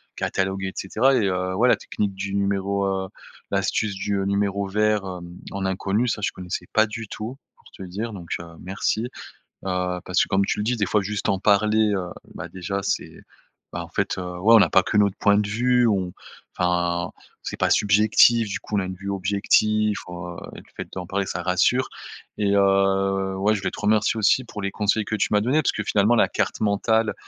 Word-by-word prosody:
catalogué 95 Hz, 0 st, -1 dB
et 95 Hz, -, -6 dB
cetera 125 Hz, +8 st, +2 dB
et, 115 Hz, -5 st, +2 dB
heu, 95 Hz, 0 st, -1 dB
ouais 120 Hz, +5 st, +3 dB
la -, -, +6 dB
technique 100 Hz, -2 st, -3 dB
du 100 Hz, +1 st, -4 dB
numéro, 100 Hz, 0 st, 0 dB
heu, 95 Hz, -1 st, -1 dB, 0.4 s
l'astuce 105 Hz, -3 st, 0 dB
du, 100 Hz, +1 st, -2 dB
heu, 95 Hz, -, -1 dB
numéro 100 Hz, 0 st, 0 dB
vert, 105 Hz, +1 st, +1 dB
hem, 90 Hz, -1 st, -8 dB
en 95 Hz, 0 st, -3 dB
inconnu, 100 Hz, +5 st, 0 dB
ça 105 Hz, -, -1 dB
je -, -, 0 dB
connaissais 90 Hz, -1 st, -6 dB
pas 110 Hz, 0 st, +4 dB
du 110 Hz, 0 st, -7 dB
tout, 110 Hz, +5 st, -6 dB, 0.2 s
pour -, -, -29 dB
te -, -, -12 dB
dire. 105 Hz, +5 st, -5 dB
Donc, 90 Hz, -4 st, -9 dB
heu, 85 Hz, -, -8 dB, 0.2 s
merci, 95 Hz, +4 st, -1 dB
heu, -, -, -6 dB, 0.9 s
parce 90 Hz, +2 st, +1 dB
que, -, -, -2 dB
comme 100 Hz, +1 st, +2 dB
tu -, -, -1 dB
le 105 Hz, -, -1 dB
dis, 120 Hz, +3 st, 0 dB
des 105 Hz, -3 st, 0 dB
fois, 105 Hz, +2 st, +1 dB
juste 105 Hz, +1 st, -3 dB
en 95 Hz, -, +2 dB
parler, 105 Hz, +2 st, +3 dB
heu, 90 Hz, -2 st, -2 dB, 0.3 s
bah, 80 Hz, +2 st, -7 dB
déjà, 95 Hz, +3 st, -4 dB
c'est, -, -, -3 dB, 0.5 s
bah, 85 Hz, -, -4 dB
en 85 Hz, -, -9 dB
fait, 95 Hz, +2 st, -2 dB
heu, -, -, -3 dB, 0.2 s
ouais, 110 Hz, +6 st, +5 dB
on 110 Hz, -, +8 dB
a -, -, +2 dB
pas 95 Hz, -, +5 dB
que 105 Hz, -, -2 dB
notre 100 Hz, -1 st, +3 dB
point 100 Hz, 0 st, +4 dB
de 105 Hz, -, +1 dB
vue. 125 Hz, +3 st, +2 dB
On, 95 Hz, -4 st, 0 dB, 0.4 s
enfin, 90 Hz, -1 st, 0 dB, 0.3 s
c'est -, -, -6 dB
pas -, -, +1 dB
subjectif 105 Hz, +2 st, +4 dB
du 100 Hz, -, -4 dB
coup. 105 Hz, -, -4 dB
On 100 Hz, -, +3 dB
a -, -, -2 dB
une 95 Hz, -, -5 dB
vue 100 Hz, +1 st, -6 dB
objectif, 105 Hz, +2 st, +2 dB
heu, 90 Hz, 0 st, -7 dB, 0.2 s
et -, -, -10 dB
le -, -, -18 dB
fait -, -, -6 dB
d'en 90 Hz, -2 st, -5 dB
parler 100 Hz, +1 st, -2 dB
ça -, -, -4 dB
rassure 95 Hz, +8 st, +2 dB, 0.5 s
et 100 Hz, -1 st, +2 dB
heu, 95 Hz, -1 st, +2 dB
ouais, 105 Hz, +3 st, +2 dB
je 100 Hz, -, -3 dB
voulais -, -, -2 dB
te -, -, -8 dB
remercier 110 Hz, +1 st, +2 dB
aussi 110 Hz, +5 st, +3 dB
pour 105 Hz, -3 st, -8 dB
les 100 Hz, -, -1 dB
conseils 105 Hz, +1 st, +1 dB
que 110 Hz, -, -3 dB
tu 105 Hz, -, +1 dB
m'as 105 Hz, -, +4 dB
donnés 145 Hz, +7 st, +2 dB
parce -, -, +1 dB
que, 110 Hz, -, -4 dB
finalement, 105 Hz, +3 st, +3 dB
la -, -, +4 dB
carte -, -, -2 dB
mentale, 110 Hz, +2 st, +1 dB
100 Hz, 220 wpm, -23 LUFS, 95-105 Hz, 0.9 s, on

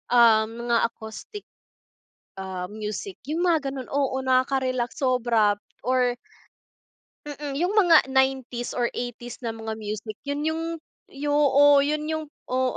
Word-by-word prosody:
um, 225 Hz, -2 st, +6 dB, 0.2 s
mga 235 Hz, -, +4 dB
acoustic, 230 Hz, -, -9 dB, 1.0 s
ah, 185 Hz, -1 st, -4 dB
music, 215 Hz, -, -5 dB, 0.2 s
yung 340 Hz, +3 st, 0 dB
mga 310 Hz, -5 st, +2 dB
ganun. 260 Hz, -2 st, -6 dB
Oo 275 Hz, -2 st, 0 dB
nakaka-relax 255 Hz, -1 st, +1 dB
sobra 240 Hz, -5 st, +3 dB, 0.3 s
or 250 Hz, -1 st, +2 dB, 1.1 s
mm. 290 Hz, -1 st, -5 dB
Yung 355 Hz, +4 st, +1 dB
mga 350 Hz, -9 st, +6 dB
90's 265 Hz, -2 st, 0 dB
or 240 Hz, -1 st, +2 dB
80's 245 Hz, 0 st, -6 dB
na 230 Hz, -, -2 dB
mga 220 Hz, -1 st, -5 dB
music 215 Hz, 0 st, -5 dB
yun 285 Hz, +1 st, -3 dB
yung, 320 Hz, +1 st, -1 dB, 0.5 s
yu 290 Hz, +1 st, -3 dB
o, 285 Hz, 0 st, +6 dB
yun 300 Hz, +1 st, -1 dB
yung 315 Hz, 0 st, -2 dB, 0.3 s
oo. 255 Hz, 0 st, +1 dB
260 Hz, 130 wpm, -25 LUFS, 235-290 Hz, 1.1 s, um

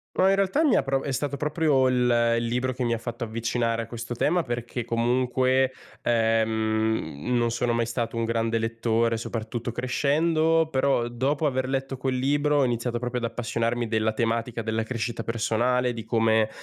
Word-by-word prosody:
No, 190 Hz, -, +4 dB
in 195 Hz, -, +4 dB
realtà 195 Hz, +11 st, +2 dB
mi 280 Hz, -, +4 dB
ha -, -, +3 dB
pro 135 Hz, 0 st, -1 dB
è 140 Hz, -, -3 dB
stato 140 Hz, +2 st, -2 dB
proprio 150 Hz, -2 st, +2 dB
il 120 Hz, -2 st, +3 dB
il 115 Hz, -, -1 dB
libro 125 Hz, +2 st, -1 dB
che 125 Hz, 0 st, -4 dB
mi 120 Hz, -1 st, 0 dB
ha 115 Hz, -, -3 dB
fatto 120 Hz, +1 st, -6 dB
avvicinare 115 Hz, 0 st, -1 dB
a -, -, -7 dB
questo 120 Hz, +1 st, -6 dB
tema, 170 Hz, +8 st, +2 dB
perché 120 Hz, -1 st, -4 dB
comunque, 130 Hz, +2 st, +1 dB, 0.3 s
ehm, 110 Hz, -, 0 dB
non 120 Hz, -1 st, +1 dB
sono 120 Hz, 0 st, 0 dB
mai 115 Hz, 0 st, 0 dB
stato 115 Hz, 0 st, -3 dB
un 115 Hz, -, 0 dB
grande 115 Hz, 0 st, 0 dB
lettore, 115 Hz, 0 st, 0 dB
soprattutto 115 Hz, +1 st, -4 dB
crescendo. 155 Hz, +6 st, +1 dB
Però 135 Hz, -4 st, +1 dB
dopo 135 Hz, +6 st, -1 dB
aver 130 Hz, -1 st, 0 dB
letto 135 Hz, 0 st, -2 dB
quel 130 Hz, 0 st, -1 dB
libro 145 Hz, +2 st, +2 dB
ho 140 Hz, -, +4 dB
iniziato 120 Hz, -1 st, -1 dB
proprio 125 Hz, 0 st, -3 dB
ad 115 Hz, -, -1 dB
appassionarmi 115 Hz, 0 st, -1 dB
della 110 Hz, -1 st, 0 dB
tematica 115 Hz, +1 st, -1 dB
della 110 Hz, +1 st, -1 dB
crescita 115 Hz, 0 st, -3 dB
personale, 120 Hz, +2 st, 0 dB
di 115 Hz, -1 st, -6 dB
come 110 Hz, -1 st, +2 dB
120 Hz, 180 wpm, -25 LUFS, 115-130 Hz, 0.3 s, No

